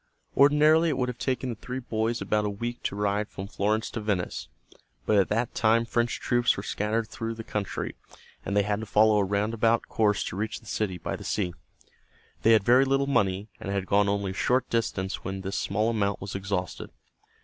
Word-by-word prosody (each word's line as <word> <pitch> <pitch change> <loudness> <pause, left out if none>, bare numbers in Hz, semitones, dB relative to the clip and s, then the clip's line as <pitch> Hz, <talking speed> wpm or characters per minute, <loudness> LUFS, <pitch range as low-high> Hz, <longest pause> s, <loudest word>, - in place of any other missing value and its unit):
Ordinarily 150 +4 +5
it 140 - -1
would 125 -1 0
have 125 - -6
taken 130 -1 -1
the 120 - -3
three 125 +4 -6
boys 115 -1 -2
about 105 0 +1
a 105 - 0
week 120 +4 -4
to - - -1
ride 105 +1 0
from 95 - -7
Florence 105 +3 -1
to 110 - -4
Venice, 100 -4 -2 0.6
but 110 - +2
at 95 - +2
that 115 +2 0
time 115 +1 +3
French 120 0 0
troops 120 0 +2
were 95 - -4
scattered 110 +2 -1
through 115 0 -5
the 115 - -7
country, 105 -3 -3 0.5
and 100 - -1
they 100 - +4
had 105 +1 -1
to 110 - -6
follow 105 +1 +4
a - - +3
roundabout 110 +3 +1
course 105 -3 +2
to - - -5
reach 105 +2 -3
the - - -22
city 100 -3 -2
by - - -4
the - - -9
sea. 90 -4 -1 0.9
They 115 - +5
had 110 -3 +4
very 125 +5 +6
little 135 +1 +2
money, 105 -6 +1
and 100 - -5
had 100 -1 -1
gone 100 +1 +3
only 100 -1 -1
a - - -6
short 125 +6 +1
distance 95 -5 -1
when 95 +1 -4
this 95 +1 -3
small 105 +3 0
amount 100 -3 0
was 95 +1 -6
exhausted. 95 -2 -3
105 Hz, 210 wpm, -27 LUFS, 100-115 Hz, 0.9 s, very